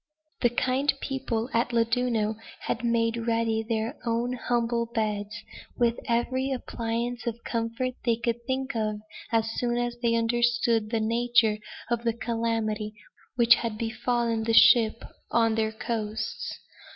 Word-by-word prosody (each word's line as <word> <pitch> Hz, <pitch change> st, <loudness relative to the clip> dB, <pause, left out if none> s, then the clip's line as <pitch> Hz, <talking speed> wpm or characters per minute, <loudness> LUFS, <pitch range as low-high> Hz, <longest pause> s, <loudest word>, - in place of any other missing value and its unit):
The 240 Hz, -, +5 dB
kind 255 Hz, +4 st, +1 dB
people 255 Hz, -4 st, -2 dB
at 230 Hz, +1 st, +2 dB
Llandudno 230 Hz, -2 st, +1 dB, 0.3 s
had 225 Hz, -, -2 dB
made 230 Hz, 0 st, +1 dB
ready 225 Hz, -1 st, +1 dB
their 225 Hz, 0 st, -2 dB
own 235 Hz, +1 st, 0 dB
humble 235 Hz, -1 st, 0 dB
beds, 215 Hz, -1 st, -2 dB, 0.3 s
with 235 Hz, -1 st, +2 dB
every 255 Hz, +3 st, 0 dB
appliance 240 Hz, -1 st, -3 dB
of 235 Hz, 0 st, -3 dB
comfort 230 Hz, +2 st, -2 dB
they 235 Hz, -2 st, +3 dB
could 235 Hz, 0 st, -2 dB
think 265 Hz, -1 st, -2 dB
of, 215 Hz, -1 st, 0 dB, 0.4 s
as 225 Hz, -1 st, +1 dB
soon 240 Hz, -1 st, 0 dB
as 240 Hz, 0 st, -1 dB
they 235 Hz, -1 st, +2 dB
understood 235 Hz, -1 st, +2 dB
the 225 Hz, 0 st, 0 dB
nature 230 Hz, -1 st, +2 dB, 0.3 s
of 235 Hz, -1 st, 0 dB
the 230 Hz, -1 st, +1 dB
calamity 225 Hz, -2 st, -2 dB, 0.4 s
which 235 Hz, -1 st, +7 dB
had 230 Hz, -2 st, -1 dB
befallen 230 Hz, 0 st, 0 dB
the 225 Hz, 0 st, +2 dB
ship 230 Hz, -1 st, +6 dB, 0.3 s
on 225 Hz, -1 st, +3 dB
their 220 Hz, 0 st, 0 dB
coasts. 220 Hz, -1 st, -3 dB
230 Hz, 140 wpm, -27 LUFS, 225-240 Hz, 0.4 s, which